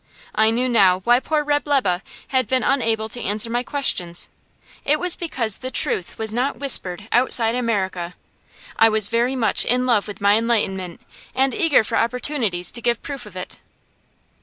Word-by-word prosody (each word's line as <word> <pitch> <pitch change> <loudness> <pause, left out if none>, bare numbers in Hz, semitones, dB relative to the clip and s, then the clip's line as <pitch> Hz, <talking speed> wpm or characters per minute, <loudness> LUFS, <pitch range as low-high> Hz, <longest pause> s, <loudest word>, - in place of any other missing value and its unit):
I 220 +1 +3
knew 245 +3 0
now 195 -6 +3
why 240 +5 +3
poor 305 +2 -1
Reb' 290 0 -1
Lebe 200 -11 +1 0.3
had 260 -4 0
been 255 0 0
unable 225 -4 0
to 240 +2 -4
answer 210 +3 -1
my 240 +1 0
questions; 225 - -1 0.5
it 300 +1 +1
was 360 -1 0
because 240 - -2
the 255 - -5
truth 190 -7 -1
was 220 -1 -3
not 255 +4 -2
whispered 205 -8 +2
outside 235 -2 +5
America. 190 -7 -3 0.6
I 225 - +6
was 215 -2 +2
very 240 +3 0
much 225 -5 +2
in 250 +1 0
love 230 -5 +1
with 205 -1 -9
my 205 +2 +3
enlightenment, 195 -6 -2 0.3
and 265 0 +1
eager 330 - +3
for - - -2
opportunities 230 -6 -1
to 235 - -4
give 235 -1 -1
proof 275 -6 -7
of 195 - -15
it. 185 0 -8
230 Hz, 175 wpm, -20 LUFS, 205-260 Hz, 0.6 s, I